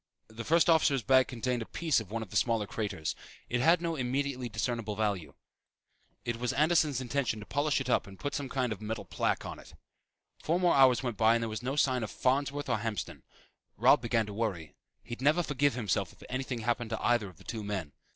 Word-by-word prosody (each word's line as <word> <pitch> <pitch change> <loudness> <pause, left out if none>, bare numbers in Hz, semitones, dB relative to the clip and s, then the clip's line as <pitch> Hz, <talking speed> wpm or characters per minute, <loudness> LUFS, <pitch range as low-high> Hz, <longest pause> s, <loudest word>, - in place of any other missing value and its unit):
The 115 +1 -7
first 165 +7 +3
officer's 155 -6 +4
bag 130 0 +5
contained 125 0 -2
a 115 - -6
piece 160 -7 +1
of 110 -4 -8
one 115 +1 -3
of 105 - -13
the - - -8
smaller 115 -1 +2
craters. 100 -7 -3 0.3
It 120 0 0
had 165 +4 +4
no 165 -1 -1
immediately 130 -1 -2
discernable 115 -1 -2
value. 100 -6 -2 0.9
It 120 -1 -2
was 125 +2 -1
Anderson's 150 -2 +2
intention 125 -3 -1
to 105 - -9
polish 145 +3 +1
it 135 - -4
up 125 - +1
and 95 -1 -12
put 145 - -4
some 140 -2 -3
kind 125 -3 0
of 110 - -12
a - - -8
metal 110 +1 -4
plaque - - -1
on - - -6
it. - - -15 0.7
Four 170 +3 +1
more 180 -2 +4
hours 130 -2 +5
went 120 -5 -3
by 110 +1 +5
and 115 - 0
there 115 - -2
was 110 - -4
no 130 +3 -2
sign 130 -4 +2
of 110 - -3
Farnsworth 140 +2 0
or - - 0
Hamston. 105 -3 -4 0.6
Robb - - +5
began 115 -1 +1
to 105 - -7
worry. 95 -8 -3 0.3
He'd 120 +1 -7
never 155 +6 +3
forgive 145 -2 +1
himself 110 -8 -1
if - - -17
anything 130 -2 -3
happened 120 +1 -1
to 110 - -3
either 120 -4 +2
of 90 - -17
the 95 - -16
two 110 0 -5
men. 95 -7 -4
120 Hz, 225 wpm, -30 LUFS, 110-140 Hz, 0.9 s, bag